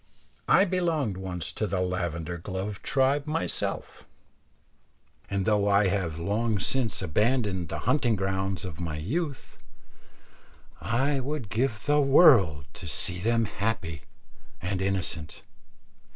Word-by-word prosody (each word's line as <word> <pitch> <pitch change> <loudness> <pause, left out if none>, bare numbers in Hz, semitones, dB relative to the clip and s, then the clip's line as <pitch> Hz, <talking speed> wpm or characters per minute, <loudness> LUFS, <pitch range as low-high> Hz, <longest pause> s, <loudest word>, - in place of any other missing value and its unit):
I 195 - +6
belonged 165 - 0
once 90 -2 -4
to 110 - -2
the 95 -2 -1
lavender 85 -2 -2
gloved 95 +3 -5
tribe 140 +2 +1
myself, 160 +2 -3 1.2
and 100 -1 -1
though 105 -2 +2
I 100 -1 +4
have 90 -5 -1
long 105 +6 0
since 115 0 -1
abandoned 100 - 0
the 80 - -3
hunting 125 -2 +2
grounds 95 -1 -2
of 90 -2 -7
my 80 -3 -3
youth, 140 - -4 1.2
I 135 +5 +1
would 135 -4 -4
give 110 +1 -1
the 145 0 +4
world 120 - +6
to 85 - -9
see 90 +5 0
them 115 +3 +2
happy 100 -6 -3 0.6
and 95 +1 -2
innocent. 95 -5 -2
100 Hz, 125 wpm, -27 LUFS, 90-130 Hz, 1.2 s, I